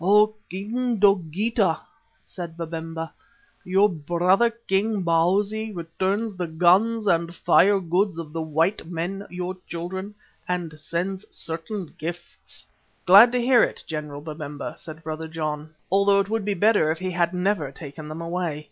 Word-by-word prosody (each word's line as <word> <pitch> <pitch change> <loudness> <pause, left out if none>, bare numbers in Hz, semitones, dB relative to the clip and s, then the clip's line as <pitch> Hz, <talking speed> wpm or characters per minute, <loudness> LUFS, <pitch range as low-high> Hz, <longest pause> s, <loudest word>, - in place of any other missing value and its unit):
"O 210 +3 +5 0.2
King 230 +6 -2
Dogeetah," 195 0 +2 0.5
said 170 -3 -8
Babemba, 165 0 -5 0.5
"your 195 +3 +4
brother 175 +6 +2
king, 215 -3 -1
Bausi, 200 +6 +1
returns 190 +6 -2
the 180 -1 -3
guns 185 +8 +3
and 170 -2 +1
fire 200 +4 +4
goods 180 +1 0
of 155 -2 -7
the 165 - -2
white 160 +4 0
men, 180 +4 -4
your 180 +1 -4
children, 190 +4 -5 0.3
and 170 -4 -3
sends 185 +5 -3
certain 165 +2 -5
gifts." 175 +3 -7 0.4
"Glad 200 +6 +9
to 250 - +2
hear 245 0 +5
it, - - 0
General 150 -2 -5
Babemba," 150 -2 -6
said 160 0 -10
Brother 160 +1 -5
John, 155 -1 -4 0.2
"although 200 +1 +4
it 200 0 0
would 225 -2 -1
be 205 -1 0
better 205 -4 +3
if 160 - 0
he 185 +2 -3
had 170 -1 +1
never 180 -5 0
taken 150 +1 -9
them 155 +2 -6
away. 170 -3 -2
180 Hz, 145 wpm, -24 LUFS, 165-200 Hz, 0.5 s, Glad